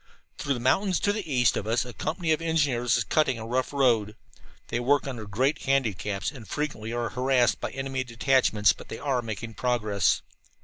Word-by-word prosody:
Through 140 -2 0
the - - -5
mountains 180 - +2
to 205 - +2
the 200 -8 -5
east 125 -3 +3
of 105 - -3
us 115 +2 +1
a 125 - -8
company 160 +4 -2
of 155 - +2
engineers 145 -8 +1
is - - +1
cutting 145 -6 +1
a 110 - -6
rough 125 +2 -1
road. 115 -7 +2 0.5
They - - -1
work 140 +3 +2
under 120 -6 -6
great 130 +9 0
handicaps 110 -6 0
and 125 -7 -11
frequently 130 -7 -3
are 120 -1 -2
harassed 125 +1 +2
by - - -2
enemy 135 0 -3
detachments. 120 -4 +3
But - - -13
they - - -6
are 135 -4 0
making 115 0 -6
progress. 110 -5 +1
125 Hz, 190 wpm, -27 LUFS, 115-140 Hz, 0.5 s, east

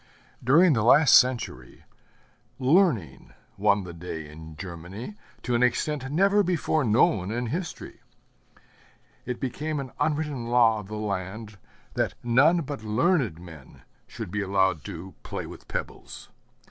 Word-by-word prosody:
During 155 +7 +5
the 110 - +1
last 140 +7 +6
century, 120 - +2 0.7
Learning 130 - +1 0.2
won 100 0 +2
the 90 -1 -8
day 80 -2 -7
in 80 +1 -11
Germany 90 - -8 0.3
to 125 - -2
an 120 - +2
extent 135 +2 0
never 195 +6 +3
before 170 -4 0
known 105 -4 +2
in 120 +3 -2
history. 165 +9 -5 1.3
It 125 -1 -3
became 150 +4 -3
an 135 -3 -6
unwritten 150 -5 -1
law 120 -2 +4
of 105 - -10
the 105 +1 -6
land 105 +1 -5 0.3
that - - -1
none 140 +9 +4
but 140 -6 -6
learned 115 - +1
men 80 -6 -13 0.2
should - - -7
be 105 +1 -2
allowed 95 -5 +1
to 90 +3 -8
play - - -6
with - - -12
pebbles. - - -7
115 Hz, 135 wpm, -26 LUFS, 95-145 Hz, 1.3 s, last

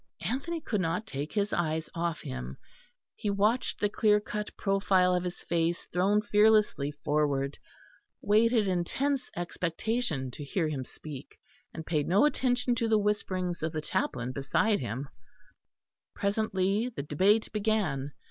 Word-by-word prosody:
Anthony 275 - -2
could 215 -9 -1
not 180 +5 -1
take 145 -5 -5
his 205 -1 0
eyes 160 -1 0
off 170 -1 -2
him; 65 +1 -6 0.6
he 210 - -3
watched 210 +5 +1
the 205 - +2
clear 210 0 +3
cut 210 0 -4
profile 195 -2 +3
of 180 0 +1
his 180 -1 -5
face 170 0 0
thrown 200 +4 +3
fearlessly 210 -8 +3
forward, 145 -1 -1 0.6
waited 220 +1 +3
in 180 -2 +1
tense 275 +7 -1
expectation 175 - -2
to 145 - -7
hear 160 +3 -1
him 140 -4 -3
speak, 145 -1 -10 0.3
and 160 - -7
paid 150 -3 0
no 195 +9 +5
attention 250 -4 +1
to 230 -1 0
the 220 -1 +4
whisperings 185 -4 -1
of 160 0 -2
the 155 - -1
chaplain 125 -4 -2
beside 140 - +1
him. 125 +3 -4 1.1
Presently 200 +1 0
the 225 - -6
debate 195 +10 +2
began. 200 -11 0
185 Hz, 145 wpm, -29 LUFS, 155-215 Hz, 1.1 s, no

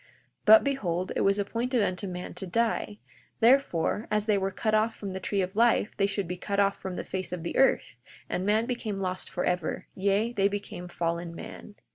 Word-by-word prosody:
42:6 - - -28 0.4
But 220 +1 +9
behold, 185 -11 -1
it - - +1
was 195 +1 +3
appointed 230 +4 0
unto 190 0 -2
man 180 -1 -6
to 190 - -5
die—therefore, 180 - 0
as 210 -1 +1
they 215 -2 +3
were 195 -1 0
cut 215 +3 -2
off 215 +1 +2
from 200 -2 -6
the 190 - -4
tree 195 +1 0
of 185 +2 -5
life 230 -1 +3
they 195 - +3
should 200 -2 -2
be 180 +1 -4
cut 200 +2 -2
off 200 0 +2
from 190 -1 -4
the - - -4
face 185 -1 -4
of 180 -2 -4
the 170 - -4
earth—and 260 -7 0
man 215 +3 +2
became 235 -5 -3
lost 185 -1 -3
forever, 180 -2 -1
yea, 200 +4 +1
they 200 -3 +3
became 200 -3 -5
fallen 170 0 -3
man. 205 +4 -9
200 Hz, 200 wpm, -28 LUFS, 180-215 Hz, 0.4 s, But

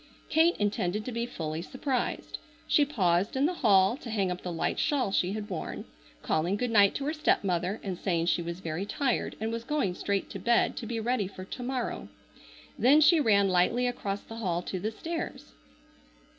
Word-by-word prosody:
Kate 325 +2 +4
intended 205 0 -1
to 255 - -4
be 235 0 -2
fully 160 -7 -4
surprised. 260 - -3 0.3
She 295 - +4
paused 190 -7 +1
in 265 +2 +2
the 350 - +1
hall 195 -1 +5
to 270 -5 -9
hang 200 -4 0
up 180 - -4
the 180 - -4
light 165 - -1
shawl 270 -9 +1
she 185 0 +1
had 210 -1 -4
worn, 180 -5 -5 0.4
calling 170 +5 +1
good 245 +1 -1
night 205 -3 +5
to 275 - -3
her 300 - 0
stepmother 195 - 0
and 185 -3 -4
saying 170 -4 0
she 175 0 +1
was 170 +2 -5
very 165 +2 -3
tired 245 +5 -1
and 220 +1 -2
was 230 0 -4
going 285 -10 0
straight 200 +2 -2
to 195 - -6
bed 235 +5 +2
to 225 - -5
be 230 0 -2
ready 225 -3 0
for 185 -1 -9
to 250 - -7
morrow. 250 0 -3 0.7
Then 275 +5 +6
she 320 +2 +6
ran 200 -7 +4
lightly 185 +7 +2
across 205 -5 -2
the 225 - -9
hall 180 -6 -1
to 185 - -4
the 210 - -1
stairs. 330 - -5
210 Hz, 200 wpm, -29 LUFS, 185-250 Hz, 0.7 s, Then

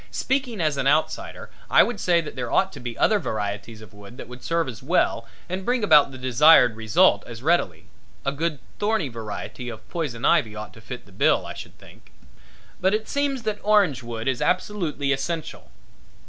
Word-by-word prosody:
Speaking 260 -5 -2
as 155 -4 0
an 135 0 0
outsider 155 +3 -1 0.2
I - - +7
would 235 -4 -3
say 175 -3 +3
that 155 - -8
there 125 -2 -4
ought 190 0 +2
to 140 - -9
be 120 -2 -6
other 215 -1 +3
varieties 105 - -4
of 105 - -15
wood 105 +3 -13
that - - -9
would 125 +1 -11
serve 165 -1 0
as 120 -4 -7
well 170 +8 +1 0.2
and 185 +2 -4
bring 245 +2 0
about 150 -8 +6
the 130 - -9
desired 130 -1 +5
results 110 -2 +3
as 115 0 -9
readily 140 - +1 0.4
a 140 - +1
good 155 +2 -2 0.2
thorny 205 -8 0
variety 115 +2 -6
of 110 -1 -10
poison 140 -9 -3
ivy 125 -11 +3
ought 105 0 -8
to 110 - -15
fill 125 +3 -7
the 100 - -19
bill, 95 - +2
I - - -6
should - - -11
think. - - -18 0.7
But 190 +3 +2
it 215 0 -4
seems 280 -3 -1
that 215 -1 -2
orange 200 - +3
wood 115 -1 -6
is 130 -2 0
absolutely 175 -7 -1
essential. 155 - -4
140 Hz, 195 wpm, -24 LUFS, 115-185 Hz, 0.7 s, I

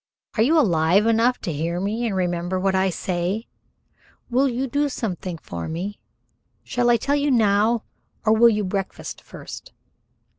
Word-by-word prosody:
"Are 215 - +2
you 300 +9 +4
alive 180 - +3
enough 230 +2 +3
to 170 - -3
hear 165 +4 -2
me 220 +5 -1
and 205 - -2
remember 175 0 -1
what 190 +1 +1
I 190 0 +2
say? 185 +5 -2 0.9
Will 265 +3 +3
you 250 +2 -1
do 285 +3 0
something 185 -8 -4
for 85 - -6
me? 185 +6 -4 0.6
Shall 245 -1 0
I 240 - +5
tell 280 +5 -1
you 290 0 +1
now 220 -1 +3 0.4
or 215 - +5
will 235 +2 +6
you 210 -2 0
breakfast 195 0 -4
first?" - - -10
205 Hz, 160 wpm, -23 LUFS, 180-235 Hz, 0.9 s, will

